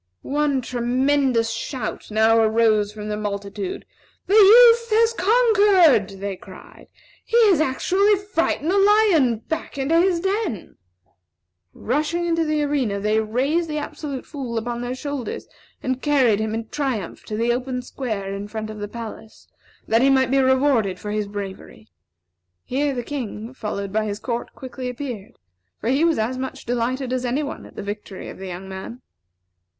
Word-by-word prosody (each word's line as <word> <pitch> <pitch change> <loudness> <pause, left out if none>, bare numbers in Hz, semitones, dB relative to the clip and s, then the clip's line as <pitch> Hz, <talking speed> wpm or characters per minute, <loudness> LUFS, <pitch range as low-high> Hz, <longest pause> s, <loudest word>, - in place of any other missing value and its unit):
One 285 -1 0
tremendous 250 0 +1
shout 230 +1 -5
now 220 +1 +4
arose 220 -2 +3
from 210 0 -8
the 210 - -1
multitude. 200 -1 -5 0.4
"The 390 - -1
youth 465 +3 +7
has 455 +1 +3
conquered!" 390 - +4
they 200 0 -3
cried. - - -14 0.4
"He 465 - 0
has 320 -5 +3
actually 375 +9 +2
frightened 365 -5 -1
the 400 - +3
lion 390 - +4
back 320 -2 -4
into 290 +5 +2
his 360 -2 +2
den!" 385 - -3 1.0
Rushing 305 +7 -1
into 330 -1 +1
the 305 -1 0
arena, 265 -9 0
they 210 +2 +1
raised 270 +10 0
the 305 - -2
Absolute 290 -2 -5
Fool 255 -6 -5
upon 240 +1 -3
their 245 +1 -3
shoulders 285 -2 -5 0.4
and 260 0 -2
carried 260 -8 +3
him 220 0 -2
in 225 0 -5
triumph 260 - -3
to 215 - -4
the 235 +2 +2
open 250 0 -3
square 215 -7 -4
in 200 +1 -5
front 215 0 -5
of 215 - -9
the 205 - -4
palace, 220 0 -9 0.4
that 225 +1 +3
he 270 - +5
might 265 -2 +3
be 275 - +3
rewarded 260 -7 +2
for 210 - -5
his 210 -1 -1
bravery. 195 - -8 0.7
Here 275 +2 -1
the 245 - -3
King, 235 -4 -6
followed 200 -5 -5
by 215 0 +1
his 205 -1 -3
court, 235 +2 -4
quickly 255 -1 -6
appeared; 245 -5 -6 0.5
for 225 - -2
he 270 +5 +2
was 335 -1 +3
as 240 +4 -1
much 265 0 -6
delighted 245 +2 -1
as 255 -1 -1
any 255 +4 -1
one 285 - -6
at - - -18
the - - -6
victory 205 -1 -7
of - - -10
the 190 - -7
young 185 +1 -7
man. 190 +6 -8
250 Hz, 165 wpm, -22 LUFS, 215-295 Hz, 1.0 s, youth